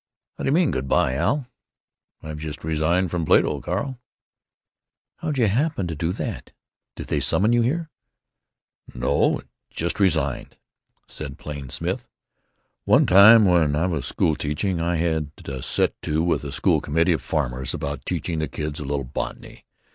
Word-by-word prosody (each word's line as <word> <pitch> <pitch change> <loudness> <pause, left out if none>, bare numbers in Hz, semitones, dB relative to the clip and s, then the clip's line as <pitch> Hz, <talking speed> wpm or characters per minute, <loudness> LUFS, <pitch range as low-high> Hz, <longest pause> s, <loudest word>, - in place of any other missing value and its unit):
"How - - -7
d'you - - +2
mean 165 0 +3
'good 65 - -3
by,' 65 -1 +2
Al?" 140 - 0 0.8
"I've 75 -1 -6
just 75 -1 -7
resigned 80 +3 +1
from 85 -2 -1
Plato, - - +3
Carl." 120 +8 -3 1.2
"How'd 155 -3 -3
you 120 - +4
happen 125 - 0
to 85 -2 -4
do 80 +3 -1
that? - - -5 0.4
Did - - -7
they - - -1
summon 110 +5 +2
you 120 - +4
here?" 160 +7 -1 1.0
"No. - - +1 0.3
Just 85 +4 -3
resigned," 80 -9 0 0.5
said 70 -2 -6
Plain 70 -4 -7
Smith. - - -3 0.8
"One - - +5
time 105 +4 +8
when 85 -6 +3
I 80 +4 +1
was 85 -6 -1
school 80 - +1
teaching 85 +6 -2
I 85 +1 0
had 80 -3 -1
a 65 -2 -5
set - - +1
to 80 +1 0
with 85 -4 0
a 70 - -5
school - - +2
committee 80 +4 +2
of 80 - -2
farmers 65 -5 -2
about 70 -1 -4
teaching 80 -2 -3
the 80 - -1
kids 75 +1 -5
a 75 - -5
little 70 0 -2
botany. 65 - -6
80 Hz, 160 wpm, -23 LUFS, 75-95 Hz, 1.2 s, time